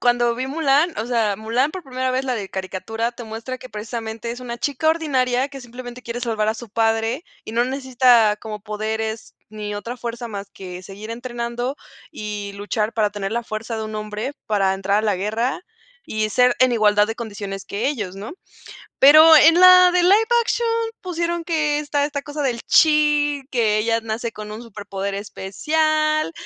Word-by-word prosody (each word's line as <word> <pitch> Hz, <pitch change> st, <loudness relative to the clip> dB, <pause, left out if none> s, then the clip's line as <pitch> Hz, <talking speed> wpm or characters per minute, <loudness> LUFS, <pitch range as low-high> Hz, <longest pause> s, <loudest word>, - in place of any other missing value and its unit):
cuando 240 Hz, -1 st, +2 dB
vi 255 Hz, +2 st, -3 dB
Mulán 300 Hz, +3 st, +2 dB
o 220 Hz, -, -1 dB
sea, 225 Hz, -5 st, +1 dB
Mulán 235 Hz, +7 st, 0 dB
por 375 Hz, -2 st, -6 dB
primera 260 Hz, -1 st, -2 dB
vez 260 Hz, +1 st, -1 dB
la 255 Hz, -2 st, -1 dB
de 200 Hz, -4 st, -5 dB
caricatura, 225 Hz, +5 st, -3 dB
te 235 Hz, 0 st, -9 dB
muestra 225 Hz, +4 st, -6 dB
que 255 Hz, -, -11 dB
precisamente 225 Hz, +1 st, -5 dB
es 245 Hz, -, -6 dB
una 240 Hz, -1 st, -5 dB
chica 285 Hz, +4 st, 0 dB
ordinaria 265 Hz, -5 st, +1 dB
que 275 Hz, -1 st, -10 dB
simplemente 245 Hz, 0 st, -9 dB
quiere 235 Hz, 0 st, -5 dB
salvar 220 Hz, -3 st, -1 dB
a 220 Hz, -, +1 dB
su 230 Hz, 0 st, -9 dB
padre 225 Hz, +5 st, 0 dB, 0.2 s
y -, -, -8 dB
no 235 Hz, +1 st, +2 dB
necesita 255 Hz, -5 st, +3 dB
como 215 Hz, -2 st, -7 dB
poderes, 220 Hz, +1 st, -4 dB, 0.2 s
ni 210 Hz, -1 st, -5 dB
otra 230 Hz, +4 st, -5 dB
fuerza 235 Hz, 0 st, -5 dB
más 200 Hz, -2 st, -7 dB
que 180 Hz, -1 st, -9 dB
seguir 200 Hz, +4 st, -9 dB
entrenando, 240 Hz, +2 st, -4 dB, 0.3 s
y 210 Hz, -6 st, -6 dB
luchar 210 Hz, +2 st, -2 dB
para 210 Hz, -2 st, +1 dB
tener 200 Hz, -1 st, -4 dB
la 235 Hz, 0 st, -1 dB
fuerza 225 Hz, +1 st, -5 dB
de 220 Hz, -, -3 dB
un 215 Hz, 0 st, -7 dB
hombre 215 Hz, +5 st, -4 dB
para 195 Hz, -3 st, +2 dB
entrar 195 Hz, +2 st, 0 dB
a 215 Hz, -, -1 dB
la 205 Hz, -, +1 dB
guerra, 220 Hz, -, -1 dB, 0.5 s
y 215 Hz, 0 st, -1 dB
ser 250 Hz, +2 st, +4 dB
en 255 Hz, -1 st, +5 dB
igualdad 210 Hz, -2 st, +4 dB
de 225 Hz, -, -4 dB
condiciones 200 Hz, -4 st, -6 dB
que 205 Hz, +6 st, -2 dB
ellos, 210 Hz, -10 st, -4 dB
¿no? 200 Hz, +3 st, -7 dB, 0.7 s
Pero 310 Hz, +3 st, +9 dB
en 330 Hz, +4 st, +6 dB
la 365 Hz, 0 st, +9 dB
de 360 Hz, 0 st, +3 dB
live 365 Hz, +3 st, +6 dB, 0.3 s
action 470 Hz, 0 st, -1 dB, 0.3 s
pusieron 340 Hz, -2 st, -2 dB
que 305 Hz, -3 st, 0 dB
esta 290 Hz, -1 st, 0 dB
esta 285 Hz, -1 st, -4 dB
cosa 295 Hz, 0 st, -4 dB
del 240 Hz, -3 st, -1 dB
chi, 295 Hz, -2 st, +4 dB
que 220 Hz, -4 st, +2 dB
ella 230 Hz, +1 st, +1 dB
nace 225 Hz, +1 st, -4 dB
con 210 Hz, 0 st, -8 dB
un 215 Hz, +2 st, -7 dB
superpoder 200 Hz, -3 st, -5 dB
especial 310 Hz, -, 0 dB
235 Hz, 185 wpm, -21 LUFS, 215-275 Hz, 0.7 s, Pero